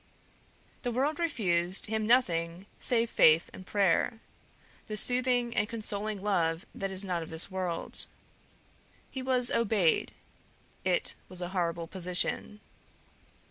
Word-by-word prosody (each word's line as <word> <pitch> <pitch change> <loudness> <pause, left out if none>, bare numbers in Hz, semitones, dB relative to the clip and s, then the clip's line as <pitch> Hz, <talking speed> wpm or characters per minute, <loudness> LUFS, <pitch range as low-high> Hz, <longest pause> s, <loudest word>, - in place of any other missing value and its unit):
The 245 - -2
world 280 +6 -1
refused 185 - +2
him 215 0 -2
nothing 175 -7 +1
save 235 -1 +1
faith 160 +1 +4
and 185 - -11
prayer, 200 +3 +1 0.7
the 215 - -4
soothing 245 0 +1
and 205 +1 0
consoling 210 -2 -4
love 170 -4 0
that 195 - -4
is 190 +1 0
not 180 -3 -2
of 160 - -8
this 160 +4 +2
world. 180 -3 0 1.0
He 265 - -5
was 255 -2 +3
obeyed 205 -7 +1 0.7
it 185 -2 0 0.2
was 185 -1 -6
a 175 - -4
horrible 170 -2 -2
position. 180 +4 -1
195 Hz, 125 wpm, -29 LUFS, 175-230 Hz, 1.0 s, faith